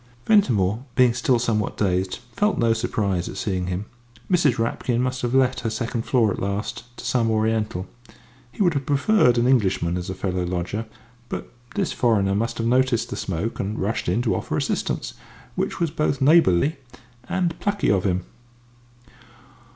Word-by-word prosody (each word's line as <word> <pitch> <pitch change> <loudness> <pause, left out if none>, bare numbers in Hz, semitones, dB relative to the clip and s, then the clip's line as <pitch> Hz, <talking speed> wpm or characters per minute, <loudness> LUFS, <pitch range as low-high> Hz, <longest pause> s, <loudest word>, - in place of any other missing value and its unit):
Ventimore, 120 - +3
being 125 -2 +5
still 125 +1 +2
somewhat 115 -3 -1
dazed, 95 -2 0 0.2
felt 210 +1 +1
no 115 -1 +3
surprise 100 -5 -1
at - - -8
seeing 90 -3 -2
him. 90 +3 -3 0.5
Mrs. 160 -9 +3
Rapkin 115 +1 -1
must 125 0 -1
have 120 +1 -1
let 130 -1 +3
her 115 - -2
second 115 +1 -3
floor 115 -5 +3
at - - -4
last 100 +4 -3
to - - -8
some 120 -2 +1
Oriental. 110 -4 0 0.7
He 200 - -1
would 175 -3 +3
have 140 -2 -3
preferred 140 - +3
an 120 - +3
Englishman 95 -9 +2
as 90 0 -5
a 95 - -4
fellow 90 -1 -2
lodger, 90 +5 -3 0.4
but - - -5 0.2
this 200 -3 0
foreigner 105 -6 +2
must 115 +4 -1
have 115 - -2
noticed 120 -1 +2
the - - -2
smoke 95 +5 -3
and 105 +3 -2
rushed 110 +3 -1
in 120 - +1
to 115 - +1
offer - - -2
assistance, - - -2 0.4
which - - -2
was 170 -3 0
both 150 -3 0
neighbourly 145 - +4 0.5
and 175 -3 -1
plucky 205 0 +1
of 95 -3 +2
him. 90 -2 0
115 Hz, 170 wpm, -23 LUFS, 100-130 Hz, 0.7 s, being